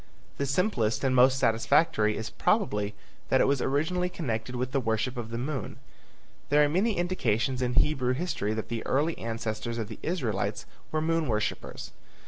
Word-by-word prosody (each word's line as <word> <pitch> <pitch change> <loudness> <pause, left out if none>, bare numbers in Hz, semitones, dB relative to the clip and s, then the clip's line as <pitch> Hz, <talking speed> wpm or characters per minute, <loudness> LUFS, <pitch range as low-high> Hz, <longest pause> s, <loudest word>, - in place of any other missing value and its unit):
The 140 - -1
simplest 135 - +1
and 130 -1 +2
most 130 +1 +6
satisfactory 115 -2 +3
is 110 - -5
probably 105 - 0 0.3
that - - +4
it - - +5
was 140 -2 +2
originally 160 +7 0
connected 125 -8 -3
with 125 +1 -2
the 135 - +1
worship 115 +1 -1
of 120 -2 -5
the 115 - -4
moon. 135 +2 -3 0.7
There 150 +1 +5
are - - +4
many 195 +6 +1
indications 130 - 0
in 125 -1 0
Hebrew 130 -3 +2
history 130 - -2
that 110 - -4
the 115 -1 -3
early 155 +5 +1
ancestors 115 0 -3
of 110 -2 -3
the 110 - -8
Israelites 125 - -2 0.3
were 155 - 0
moon 165 -1 +1
worshippers. 110 -2 -3
130 Hz, 170 wpm, -28 LUFS, 115-155 Hz, 0.7 s, most